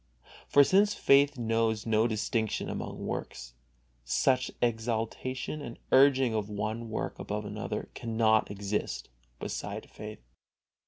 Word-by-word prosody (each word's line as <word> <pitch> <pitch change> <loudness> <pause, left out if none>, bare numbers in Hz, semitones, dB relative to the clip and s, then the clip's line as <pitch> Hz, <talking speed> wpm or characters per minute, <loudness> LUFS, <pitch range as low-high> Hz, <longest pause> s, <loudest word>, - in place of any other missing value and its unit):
For 145 - +7
since 205 +7 +4
faith 140 0 +4
knows 115 -1 0
no 110 0 +3
distinction 110 0 -1
among - - -5
works, - - -5 0.5
such 130 - +2
exaltation 120 +4 -2
and 120 -5 -7
urging 135 -3 +5
of 105 -1 -1
one 110 +2 -3
work 110 - -4
above 105 0 -4
another 105 +1 -4
cannot 110 -1 +2
exist 100 +1 -3 0.3
beside - - -5
faith. 105 - -9
115 Hz, 115 wpm, -30 LUFS, 110-130 Hz, 0.5 s, For